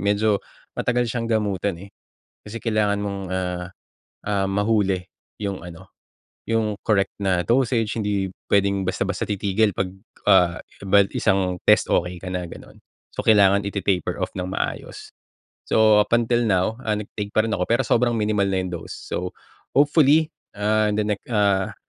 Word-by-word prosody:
medyo 100 +1 +1 0.3
matagal 125 0 0
siyang 115 -1 -3
gamutan, 100 -4 0
eh. 100 - -16 0.5
Kasi 115 +2 -7
kailangan 105 -3 +1
mong, 100 -1 -3
ah, 90 -1 -3 0.6
ah, 100 -2 +1
mahuli 100 -1 +1 0.4
yong 100 -4 -4
ano, 90 +2 -11 0.6
yong 110 -2 +1
correct 100 -2 +1
na 90 -3 +1
dosage.b 115 -3 +1
Hindi 105 0 -1 0.4
puwedeng 100 -1 +2
basta-basta 95 +1 -2
titigil. 105 +1 +1
Pag 95 0 -3 0.9
ba 100 +1 +4 0.2
isang 90 -2 0
test 105 - +4
okey 90 +1 0
ka 95 - -10
na 90 0 -3
gano'n. 85 - -10 0.4
So, - - -3
kailangan 100 -2 +5
iti-taper-off 100 -3 -2
ng 90 -1 -4
maayos. 95 - -5 0.5
So, 110 -1 +5
up 105 +3 +2
until 120 0 +2
now, 100 +2 +1
ah, 110 - +1
nag-take 105 0 -6
pa 110 - +4
rin 115 - -2
ako. 90 -4 -1
Pero, 120 +3 +2
sobrang 120 0 +2
minimal 105 -2 +1
na 95 -1 0
'yong 90 - -5
dose. 80 - -9
So, 90 0 -5 0.4
hopefully, 150 +2 +4 0.2
ah, 105 +1 +1
the 105 - +1
next, 105 -1 -3
ah, 100 -4 +1
100 Hz, 150 wpm, -23 LUFS, 95-110 Hz, 0.9 s, kailangan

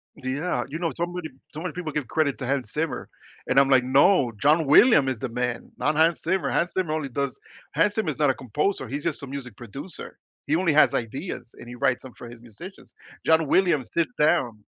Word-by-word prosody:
Yeah, 130 +1 -2
you 160 +3 -6
know, 165 -2 -1
so 170 - -1
many 175 -2 -6 0.2
so 155 - -6
many 175 -3 -4
people 175 -4 -5
give 145 -5 -3
credit 150 -4 0
to 130 - -4
Hans 130 -5 -1
Zimmer, 150 -5 -2 0.4
and 130 +2 +4
I'm, 140 0 +4
like, 130 -2 +5
no, 135 +1 +4
John 155 +2 +4
William 145 - +6
is 125 -5 -3
the 130 - -4
man, 125 0 -3
not 150 - 0
Hans 165 +1 +3
Zimmer. 185 +3 0
Hans 170 +1 0
Zimmer 175 -5 -1
only 150 -3 -2
does, 140 +1 -3 0.4
Hans 210 - +3
Zimmer 215 -8 0
is 145 - -3
not 145 -2 +4
a - - -2
composer, 140 - -2
he's 140 +4 -5
just - - -2
a - - -6
music 130 -5 -7
producer. 130 - -9 0.3
He 150 - +2
only 170 -1 +2
has 155 - +5
ideas 130 - -4
and 120 - -12
he 120 - -8
writes 125 +1 0
'em 130 - -10
for 120 - -11
his 120 - -12
musicians. 120 - -13 0.3
John 160 -2 +4
Williams 170 -9 +2
sits 160 -7 0
down. 120 -8 +1
145 Hz, 225 wpm, -25 LUFS, 125-165 Hz, 0.4 s, William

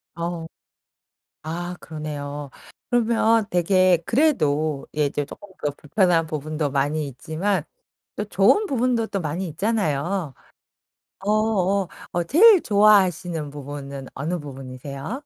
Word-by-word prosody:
어. 170 -1 -4 1.0
아 175 +3 -4
그러네요. 145 -2 -6 0.4
그러면 230 -1 +3
되게 185 +1 +4
그래도 155 - +1
예 150 -1 +3
이제 145 0 -2
조금 205 +8 -12 0.2
더 145 - +2
불편한 165 +2 +1
부분도 155 -1 -3
많이 145 +2 0
있지만 160 +9 -2 0.5
또 210 - -2
좋은 215 - +3
부분도 245 - +1
또 195 - -2
많이 170 +4 -3
있잖아요. 175 -3 -1 0.9
어어어 200 -2 +1 0.4
제일 405 +3 +7
좋아하시는 185 -7 +3
부분은 140 -1 -7
어느 165 +6 -3
부분이세요? 140 - -7
170 Hz, 250 characters per minute, -23 LUFS, 145-205 Hz, 1.0 s, 제일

